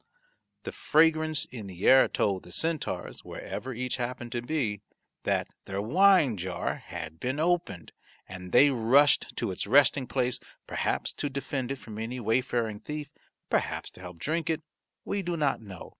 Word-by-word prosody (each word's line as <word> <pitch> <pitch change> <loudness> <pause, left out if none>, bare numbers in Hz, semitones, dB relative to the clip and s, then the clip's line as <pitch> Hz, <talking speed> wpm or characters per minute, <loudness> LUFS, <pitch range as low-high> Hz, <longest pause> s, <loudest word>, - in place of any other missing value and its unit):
The - - -5
fragrance 155 -1 +2
in 115 -5 -8
the 95 0 -3
air 130 0 +8
told 95 -3 0
the 90 - -14
centaurs, 160 - -2
wherever 130 - -6
each 125 +1 -3
happened 120 -1 -4
to 120 - -2
be, 120 -7 -1 0.4
that - - +1 0.2
their 95 0 -3
wine 155 - +4
jar 90 -1 -3
had 80 0 -8
been 130 - -2
opened, 170 - 0 0.4
and 90 -1 -8
they 140 +3 +7
rushed 130 +4 +4
to - - -1
its 95 - -4
resting 135 +1 +4
place 125 -1 0 0.3
perhaps - - -1
to 145 - -3
defend 135 -1 -3
it - - -1
from 110 -4 -9
any 120 +3 -4
wayfaring 115 -1 0
thief, 150 +5 -6 0.4
perhaps - - -1
to - - -15
help 90 -1 -9
drink 160 - -2
it, 160 -1 -1 0.4
we 200 - -1
do 175 -2 -2
not 145 -6 +1
know. 95 -5 -10
125 Hz, 165 wpm, -28 LUFS, 105-150 Hz, 0.4 s, air